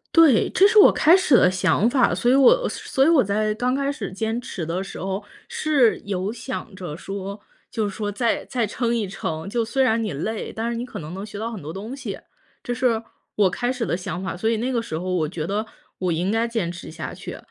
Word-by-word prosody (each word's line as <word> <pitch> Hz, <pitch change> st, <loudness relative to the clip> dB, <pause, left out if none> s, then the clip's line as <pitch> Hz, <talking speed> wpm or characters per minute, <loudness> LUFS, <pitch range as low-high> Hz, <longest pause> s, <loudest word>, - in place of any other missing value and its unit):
对， 315 Hz, -9 st, +6 dB
这 395 Hz, -, +5 dB
是 430 Hz, 0 st, +5 dB
我 -, -, +9 dB
开 325 Hz, +4 st, +5 dB
始 305 Hz, -9 st, +4 dB
的 180 Hz, -, +5 dB
想 190 Hz, +3 st, +2 dB
法。 255 Hz, -2 st, +3 dB
所 240 Hz, -, +1 dB
以 -, -, +5 dB
我 -, -, +5 dB
所 270 Hz, 0 st, 0 dB
以 -, -, +4 dB
我 305 Hz, -8 st, +5 dB
在 210 Hz, +2 st, 0 dB
刚 250 Hz, +4 st, 0 dB
开 280 Hz, 0 st, 0 dB
始 200 Hz, -9 st, -5 dB
坚 220 Hz, +4 st, -2 dB
持 175 Hz, -9 st, -5 dB
的 180 Hz, +4 st, -2 dB
时 -, -, -8 dB
候， 195 Hz, +2 st, -3 dB, 0.2 s
是 280 Hz, -7 st, +2 dB
有 200 Hz, +1 st, -3 dB
想 235 Hz, -3 st, -6 dB
着 175 Hz, -5 st, -6 dB
说， 195 Hz, +1 st, -6 dB, 0.3 s
就 220 Hz, -3 st, -1 dB
是 195 Hz, -, -6 dB
说 205 Hz, -1 st, -2 dB
再 230 Hz, +2 st, 0 dB
再 240 Hz, -4 st, -1 dB
撑 235 Hz, +3 st, -1 dB
一 215 Hz, -4 st, -1 dB
撑， 160 Hz, -3 st, -4 dB
就 235 Hz, +1 st, 0 dB
虽 265 Hz, +4 st, +1 dB
然 225 Hz, -2 st, +2 dB
你 210 Hz, -, -2 dB
累， 215 Hz, +10 st, -3 dB
但 225 Hz, +1 st, -3 dB
是 -, -, -3 dB
你 235 Hz, -, -3 dB
可 -, -, -8 dB
能 155 Hz, +2 st, -7 dB
能 195 Hz, +2 st, -6 dB
学 205 Hz, -1 st, -9 dB
到 225 Hz, +2 st, -3 dB
很 210 Hz, -, -7 dB
多 150 Hz, +2 st, -6 dB
东 215 Hz, +8 st, -6 dB
西， 275 Hz, -, -6 dB, 0.4 s
这 245 Hz, -, -2 dB
是 240 Hz, -3 st, +1 dB, 0.3 s
我 200 Hz, -3 st, +4 dB
开 245 Hz, +4 st, -1 dB
始 250 Hz, -3 st, -2 dB
的 -, -, 0 dB
想 180 Hz, 0 st, -5 dB
法。 185 Hz, -, -3 dB
所 220 Hz, +5 st, 0 dB
以 225 Hz, -, +1 dB
那 250 Hz, +4 st, -1 dB
个 235 Hz, -2 st, 0 dB
时 160 Hz, -8 st, -5 dB
候 185 Hz, +2 st, -3 dB
我 160 Hz, -4 st, +1 dB
觉 160 Hz, -3 st, -4 dB
得 205 Hz, +4 st, -1 dB, 0.4 s
我 180 Hz, -2 st, 0 dB
应 175 Hz, +5 st, 0 dB
该 225 Hz, +1 st, +1 dB
坚 225 Hz, -8 st, -2 dB
持 175 Hz, -, -9 dB
下 160 Hz, 0 st, -6 dB
去。 -, -, -8 dB
220 Hz, 265 characters per minute, -23 LUFS, 190-245 Hz, 0.4 s, 我